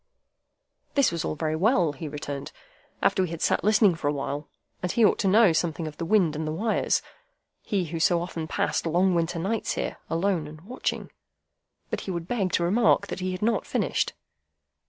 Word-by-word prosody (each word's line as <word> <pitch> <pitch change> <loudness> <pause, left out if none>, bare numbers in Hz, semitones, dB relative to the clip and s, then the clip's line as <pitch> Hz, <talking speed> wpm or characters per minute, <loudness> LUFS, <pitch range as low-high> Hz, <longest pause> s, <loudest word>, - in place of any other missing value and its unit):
That 280 -2 +4
was 170 -1 -2
all - - -2
very 155 0 -1
well, 180 - +3
he 150 +3 -6
returned, 145 -1 -6 0.5
after - - +3
we 185 - 0
had 165 -1 -5
sat - - +1
listening 210 -1 +5
for 160 -3 -3
a - - +3
while, 145 +1 -4 0.3
and 180 - -1
he 235 - +4
ought - - +3
to 195 - +1
know 205 -2 +6
something 160 -1 -1
of 150 - -8
the 165 - -3
wind 175 -5 +3
and 155 +1 -3
the - - -1
wires,—he 210 - -2
who 165 +1 -5
so 170 +1 +3
often 170 -2 -4
passed 165 - -1
long 180 +3 +3
winter 170 0 0
nights 200 +6 -1
there, - - -3
alone 165 -2 0
and 155 +1 -11
watching. 240 +9 -4 0.8
But - - -2
he - - -7
would 170 -2 -3
beg 200 -6 0
to 170 - +2
remark 205 +3 +3
that - - -4
he 185 0 -2
had 185 +2 -4
not 225 -2 +1
finished. - - 0
175 Hz, 200 wpm, -26 LUFS, 160-200 Hz, 0.8 s, know